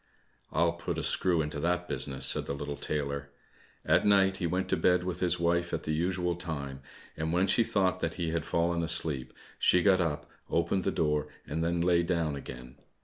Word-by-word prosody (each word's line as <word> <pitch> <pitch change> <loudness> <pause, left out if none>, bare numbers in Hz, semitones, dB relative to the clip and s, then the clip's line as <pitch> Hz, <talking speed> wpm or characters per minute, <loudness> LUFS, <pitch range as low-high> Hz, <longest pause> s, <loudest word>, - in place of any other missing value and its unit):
"I'll 85 0 +2
put 85 0 -4
a - - -3
screw 85 -4 +1
into 75 -1 -5
that 90 +3 -1
business," 65 -2 +2
said - - +3
the 70 - -2
little 70 +1 -5
tailor. 70 -1 -3 0.6
At - - +3
night 95 -2 +4
he 85 - -1
went 90 +3 -1
to - - +2
bed 90 0 +2
with 90 -1 -4
his 90 -1 +1
wife 85 +1 0
at - - -6
the - - -2
usual 90 +2 0
time, 70 -6 -6 0.3
and 80 +1 -2
when 90 +3 +2
she 115 +5 +3
thought 95 -5 0
that 80 0 -2
he 85 -3 -2
had 80 -1 -1
fallen 85 +1 0
asleep, 75 -5 +1 0.3
she 90 - +4
got 95 -2 +4
up, 80 -4 -2 0.2
opened 85 +3 0
the - - +1
door, 75 -1 0 0.2
and 80 +3 -3
then 85 0 0
lay 85 0 +3
down 85 -4 -1
again. 65 -1 -9
85 Hz, 205 wpm, -29 LUFS, 75-90 Hz, 0.6 s, night